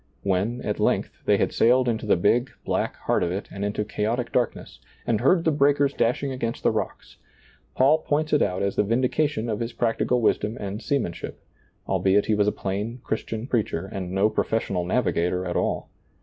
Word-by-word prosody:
When, 100 +6 0
at - - -2
length, - - 0
they - - +4
had - - 0
sailed 125 +2 +4
into 115 -2 -1
the - - +5
big, 120 +8 +2 0.2
black - - -1
heart - - 0
of 85 - 0
it 95 +3 -4
and 100 - -5
into 105 +1 -1
chaotic 115 +4 -2
darkness, 125 -1 -2 0.3
and 115 -2 +1
heard 165 +7 +4
the 160 - +4
breakers 145 -1 +3
dashing 130 +4 0
against 120 -3 -3
the - - +4
rocks, - - -5 0.6
Paul 140 +5 +4
points 155 0 -1
it 150 - +4
out 90 +2 0
as 100 - -1
the - - +3
vindi 120 +5 +1
cation 145 -7 0
of 110 -2 -2
his 115 0 -3
practical 120 +1 +1
wisdom 110 0 +1
and 100 +2 -5
seamanship, 125 - -3 0.5
albeit 100 +1 +2
he 110 - +1
was 105 -1 +2
a - - +4
plain 105 +6 -4
Christian 110 +1 -3
preacher 110 - -1
and 90 -2 -5
no 95 +2 +3
professional 100 -5 -1
navigator 90 0 0
at 90 - -3
all. - - -1
115 Hz, 190 wpm, -25 LUFS, 100-125 Hz, 0.6 s, the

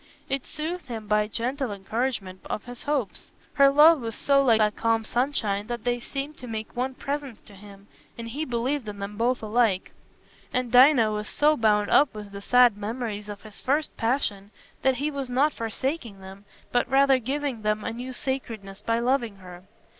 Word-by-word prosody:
It 275 -1 -2
soothed 330 +2 -5
him 225 -3 -6
by 210 0 +2
gentle 250 +3 -2
encouragement 200 -1 -3
of 210 - -4
his 245 -1 -9
hopes. 285 -8 -2 0.2
Her 275 -1 +6
love 300 +2 +6
was 225 -1 -5
so 275 -1 +3
like 235 -4 +5
that 210 -1 +2
calm 225 -1 +1
sunshine 220 -5 -1
that 240 -1 -4
they 245 0 0
seemed 275 +4 -5
to 250 - -9
make 220 -1 -6
one 255 +2 -2
presence 280 -5 -4
to 205 - -15
him, 200 0 -14 0.3
and 230 0 -6
he 285 +7 -3
believed 250 0 -2
in 205 -1 -6
them 200 +1 -6
both 240 +2 0
alike. 215 -3 +1 0.6
And 250 -2 -1
Dinah 250 -3 +6
was 210 0 -3
so 300 +1 +3
bound 210 -4 +2
up 280 -5 +4
with 210 -1 -8
the 200 0 -8
sad 245 -1 +5
memories 210 -1 -4
of 205 -1 -8
his 215 -2 -12
first 295 +4 0
passion 225 -5 -1 0.3
that 265 -1 +3
he 290 +4 -2
was 275 -3 -4
not 275 +4 +2
forsaking 230 -1 -3
them, 190 +1 -12 0.3
but 245 0 +1
rather 270 0 +4
giving 270 -1 -3
them 215 0 0
a 225 - -3
new 250 +2 -6
sacredness 225 -7 -5
by 230 0 0
loving 235 -3 0
her. 180 -1 -12
235 Hz, 190 wpm, -26 LUFS, 210-270 Hz, 0.6 s, Her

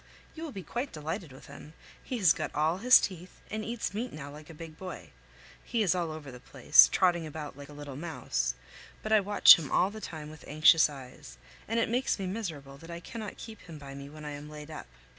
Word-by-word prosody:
You 320 - -10
will 325 -3 -5
be 195 -6 -7
quite 245 +8 -4
delighted 160 +2 -5
with 130 - -14
him. 150 - -12 0.3
He 255 - -4
has 185 -8 +5
got - - -5
all 160 +4 +1
his 250 +4 +8
teeth, 180 -1 -6
and 215 0 -3
eats 230 -1 -3
meat 235 +4 -3
now 145 -1 -8
like 150 +1 -12
a - - -9
big 160 0 -10
boy; 185 +2 -9 0.5
he 230 -2 0
is 185 - +3
all 175 -3 -2
over 155 -3 -8
the 125 - -11
place, - - +6
trotting 175 -3 +2
about 150 -2 -7
like 140 0 -11
a - - -11
little 145 -2 -8
mouse; 165 +3 -2 0.5
but 215 - -4
I 215 - +7
watch 205 -3 +8
him 150 -5 -6
all 185 +3 +3
the 215 +1 -9
time 155 -5 -7
with 155 - -13
anxious 155 +1 +6
eyes, 130 - -11 0.3
and 230 +2 0
it 230 - +2
makes 245 +3 0
me 195 - -4
miserable 160 -9 -5
that 165 - -13
I 170 0 -6
cannot 215 +3 -7
keep 225 -2 -10
him 165 -3 -11
by 140 -2 -10
me 140 0 -9
when 155 +1 -11
I 150 - -5
am 145 +1 -8
laid 150 0 -10
up. 155 - -8
160 Hz, 235 wpm, -30 LUFS, 150-205 Hz, 0.5 s, his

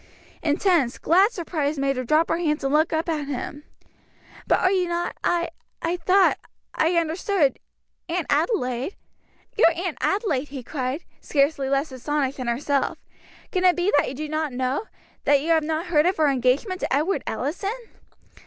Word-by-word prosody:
Intense, 305 -4 +2
glad 380 +7 +4
surprise 315 -7 -2
made 275 0 0
her 255 - -2
drop 310 +6 +2
her - - +1
hands 300 -4 0
and 270 +1 0
look 310 +2 +3
up 320 +1 -1
at 305 -4 -2
him. 285 +2 -5 0.8
"But - - +3
are 370 - +3
you 370 -2 +1
not 345 0 -2
I 340 -1 +1 0.3
I 335 +2 -1
thought 370 +3 +3 0.3
I 330 +3 +1
understood 335 -1 +1 0.5
Aunt 340 -1 -1
Adelaide 285 - 0 0.3
" - - -37
"Your 335 - +7
Aunt 350 -2 -3
Adelaide!" 355 - 0
he 270 -2 -7
cried, 260 +3 -3 0.2
scarcely 280 -1 +1
less 275 +2 0
astonished 275 +1 -2
than 255 -2 -4
herself, 275 +3 0 0.5
"can 370 -1 0
it 360 -1 +5
be 360 +3 0
that 290 - +3
you 265 - -6
do 305 +3 -4
not 310 -1 -2
know 255 - -1 0.4
that 285 -1 +5
you 320 - -4
have 325 -1 +4
not 315 +2 -2
heard 330 -2 +3
of 370 - +1
her 310 -2 +4
engagement 270 - +1
to - - -3
Edward 310 +8 +1
Allison?" 390 - -2
310 Hz, 175 wpm, -24 LUFS, 275-350 Hz, 0.8 s, Your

